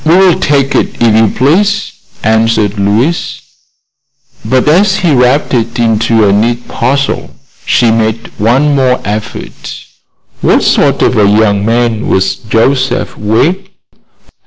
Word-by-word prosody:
"We 165 Hz, +3 st, +3 dB
will 185 Hz, -2 st, +3 dB
take 140 Hz, -5 st, 0 dB
it, -, -, -2 dB
if 115 Hz, -2 st, +2 dB
you 110 Hz, 0 st, +3 dB
please," 195 Hz, -, 0 dB, 0.3 s
answered 110 Hz, -1 st, 0 dB
Louise. 110 Hz, +12 st, -1 dB, 1.0 s
But 130 Hz, +2 st, 0 dB
as 190 Hz, +6 st, +3 dB
he 175 Hz, -5 st, 0 dB
wrapped 125 Hz, +3 st, +1 dB
it 115 Hz, -1 st, -1 dB
into 115 Hz, -1 st, +1 dB
a 100 Hz, -, +2 dB
neat 120 Hz, +4 st, -1 dB
parcel 135 Hz, +1 st, -2 dB, 0.4 s
she 120 Hz, -2 st, +2 dB
made 110 Hz, 0 st, -2 dB
one 130 Hz, +8 st, +2 dB
more 130 Hz, -2 st, +1 dB
effort. 105 Hz, +1 st, -7 dB, 0.6 s
"What -, -, +2 dB
sort -, -, +1 dB
of -, -, +1 dB
a 100 Hz, -1 st, +3 dB
young 105 Hz, -1 st, +1 dB
man 115 Hz, 0 st, -1 dB
was 95 Hz, 0 st, +1 dB
Joseph 125 Hz, +3 st, -1 dB
Wegg?" 160 Hz, -, -1 dB
120 Hz, 135 wpm, -10 LUFS, 110-140 Hz, 1.0 s, We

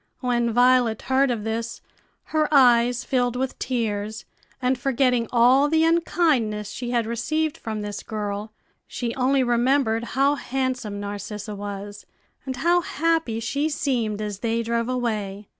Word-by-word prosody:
When 240 Hz, -2 st, +1 dB
Violet 245 Hz, -1 st, +3 dB
heard 265 Hz, +1 st, +2 dB
of 230 Hz, -4 st, -2 dB
this 225 Hz, +1 st, -3 dB, 0.5 s
her 310 Hz, -1 st, +2 dB
eyes 245 Hz, -3 st, +5 dB
filled 245 Hz, -2 st, 0 dB
with 260 Hz, +1 st, -3 dB
tears, 215 Hz, -4 st, -2 dB, 0.3 s
and 255 Hz, 0 st, +1 dB
forgetting 250 Hz, -2 st, +1 dB
all 255 Hz, +4 st, +5 dB
the 320 Hz, +1 st, +3 dB
unkindness 300 Hz, -, +1 dB
she 245 Hz, -1 st, -5 dB
had 240 Hz, -2 st, +1 dB
received 295 Hz, +7 st, -1 dB
from 220 Hz, -2 st, -5 dB
this 205 Hz, 0 st, -5 dB
girl, 210 Hz, -1 st, -4 dB, 0.4 s
she 235 Hz, -2 st, -3 dB
only 265 Hz, +1 st, +2 dB
remembered 240 Hz, -1 st, +2 dB
how 275 Hz, +1 st, +4 dB
handsome 255 Hz, -6 st, -3 dB
Narcissa 205 Hz, +1 st, -6 dB
was, 205 Hz, 0 st, -7 dB, 0.4 s
and 260 Hz, -, -2 dB
how 345 Hz, +7 st, +2 dB
happy 325 Hz, -9 st, 0 dB
she 280 Hz, +7 st, -1 dB
seemed 230 Hz, -8 st, -1 dB
as 205 Hz, -2 st, -5 dB
they 230 Hz, +1 st, -1 dB
drove 230 Hz, +1 st, -1 dB
away. 210 Hz, -5 st, -3 dB
240 Hz, 140 wpm, -24 LUFS, 215-265 Hz, 0.5 s, eyes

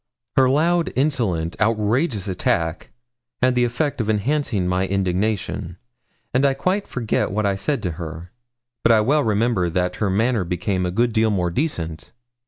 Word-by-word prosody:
Her 130 Hz, -1 st, +5 dB
loud, 165 Hz, +5 st, +2 dB
insolent, 115 Hz, -, 0 dB
outrageous 110 Hz, -, +1 dB
attack 85 Hz, -3 st, -1 dB, 0.5 s
had 130 Hz, 0 st, +3 dB
the 125 Hz, -1 st, +2 dB
effect 125 Hz, +3 st, -1 dB
of 110 Hz, -, -3 dB
enhancing 110 Hz, -3 st, 0 dB
my 90 Hz, +1 st, 0 dB
indignation, 95 Hz, -1 st, -1 dB, 0.6 s
and 130 Hz, +2 st, +2 dB
I 135 Hz, -1 st, +3 dB
quite 190 Hz, +7 st, -1 dB
forget 120 Hz, -4 st, -1 dB
what 105 Hz, +2 st, -1 dB
I 100 Hz, -1 st, +1 dB
said 105 Hz, +9 st, -1 dB
to 90 Hz, -, -1 dB
her, 85 Hz, +2 st, -7 dB, 0.5 s
but -, -, +4 dB
I 110 Hz, -1 st, +5 dB
well 145 Hz, +7 st, +2 dB
remember 110 Hz, -4 st, +1 dB
that 90 Hz, +1 st, -1 dB
her 105 Hz, -, 0 dB
manner 110 Hz, +2 st, +1 dB
became 90 Hz, +1 st, -1 dB
a -, -, -2 dB
good 120 Hz, +5 st, +1 dB
deal 110 Hz, 0 st, +3 dB
more 90 Hz, -4 st, 0 dB
decent. 85 Hz, -, -3 dB
105 Hz, 165 wpm, -22 LUFS, 90-125 Hz, 0.6 s, Her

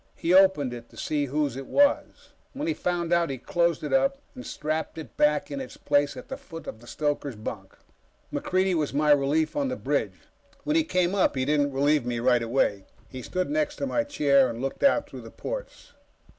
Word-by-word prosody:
He 170 Hz, -, 0 dB
opened 185 Hz, -9 st, +5 dB
it 120 Hz, -1 st, -9 dB
to -, -, -18 dB
see 150 Hz, -2 st, -1 dB
whose 145 Hz, -1 st, -1 dB
it 135 Hz, 0 st, -7 dB
was. 285 Hz, 0 st, +1 dB, 0.2 s
When 290 Hz, +4 st, -4 dB
he 325 Hz, -, +1 dB
found 175 Hz, -, -1 dB
out, 170 Hz, -1 st, +2 dB
he 135 Hz, -, -3 dB
closed 170 Hz, +4 st, 0 dB
it 150 Hz, -, -3 dB
up 275 Hz, +1 st, +3 dB, 0.2 s
and 255 Hz, -, -9 dB
strapped 155 Hz, +2 st, -3 dB
it 160 Hz, -, -9 dB
back 150 Hz, 0 st, +2 dB
in 140 Hz, -1 st, -3 dB
its 125 Hz, -, -9 dB
place 145 Hz, -1 st, +1 dB
at 125 Hz, -, -9 dB
the -, -, -6 dB
foot 165 Hz, 0 st, -10 dB
of 110 Hz, -, -7 dB
the 120 Hz, -, -16 dB
stoker's 145 Hz, -3 st, -2 dB
bunk. 105 Hz, -, -7 dB, 0.6 s
MacReidie 185 Hz, 0 st, +1 dB
was 150 Hz, -4 st, -1 dB
my 150 Hz, +1 st, +3 dB
relief 145 Hz, +2 st, +2 dB
on 285 Hz, -2 st, 0 dB
the 255 Hz, -, -2 dB
bridge. -, -, -2 dB, 0.4 s
When 300 Hz, -, 0 dB
he 320 Hz, -, +4 dB
came 185 Hz, -, +1 dB
up, 195 Hz, -7 st, +2 dB
he 130 Hz, -1 st, 0 dB
didn't 145 Hz, 0 st, +2 dB
relieve 145 Hz, +1 st, +2 dB
me 120 Hz, 0 st, -2 dB
right 120 Hz, 0 st, +3 dB
away. 115 Hz, -5 st, 0 dB, 0.2 s
He 130 Hz, -, -7 dB
stood 185 Hz, -, -2 dB
next 300 Hz, -1 st, 0 dB
to 280 Hz, -, -3 dB
my 290 Hz, +2 st, 0 dB
chair 140 Hz, -, +3 dB
and 115 Hz, 0 st, -6 dB
looked 135 Hz, +1 st, -4 dB
out 280 Hz, -, +3 dB
through -, -, -9 dB
the -, -, -10 dB
ports. -, -, -7 dB
150 Hz, 215 wpm, -26 LUFS, 135-190 Hz, 0.6 s, opened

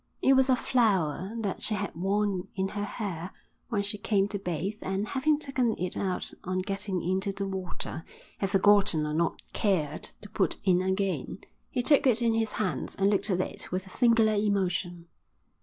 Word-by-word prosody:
It 270 Hz, -, +5 dB
was 265 Hz, 0 st, +4 dB
a 260 Hz, -, +6 dB
flower 195 Hz, -, +1 dB
that 200 Hz, -4 st, -3 dB
she 215 Hz, -, 0 dB
had 200 Hz, 0 st, -3 dB
worn 195 Hz, +1 st, 0 dB
in 190 Hz, -1 st, -1 dB
her 205 Hz, +1 st, -3 dB
hair 185 Hz, -5 st, -4 dB, 0.4 s
when 205 Hz, -4 st, 0 dB
she 205 Hz, +1 st, -1 dB
came 200 Hz, -2 st, +2 dB
to 205 Hz, -, -3 dB
bathe 190 Hz, +3 st, -3 dB
and, 195 Hz, +2 st, -2 dB
having 290 Hz, +5 st, +2 dB
taken 260 Hz, -6 st, 0 dB
it 180 Hz, +1 st, -2 dB
out 185 Hz, -2 st, -2 dB
on 185 Hz, 0 st, -2 dB
getting 195 Hz, -1 st, -2 dB
into 190 Hz, +3 st, 0 dB
the 195 Hz, 0 st, -4 dB
water, 185 Hz, -4 st, -3 dB, 0.4 s
had 195 Hz, -, 0 dB
forgotten 195 Hz, -5 st, +4 dB
or 150 Hz, -, -2 dB
not 165 Hz, +2 st, 0 dB
cared 155 Hz, -8 st, 0 dB
to 205 Hz, -, -8 dB
put -, -, 0 dB
in 185 Hz, -2 st, +3 dB
again. 190 Hz, +1 st, -1 dB, 0.3 s
He 245 Hz, -, -1 dB
took 285 Hz, +1 st, +4 dB
it 240 Hz, -1 st, +3 dB
in 230 Hz, -1 st, +3 dB
his 225 Hz, -1 st, 0 dB
hands 190 Hz, -4 st, -2 dB
and 195 Hz, +1 st, +2 dB
looked 210 Hz, +1 st, +1 dB
at 185 Hz, -2 st, +2 dB
it -, -, -6 dB
with 185 Hz, +1 st, -2 dB
a 190 Hz, -, -11 dB
singular 230 Hz, -2 st, +4 dB
emotion. 185 Hz, -4 st, 0 dB
195 Hz, 190 wpm, -28 LUFS, 185-215 Hz, 0.4 s, a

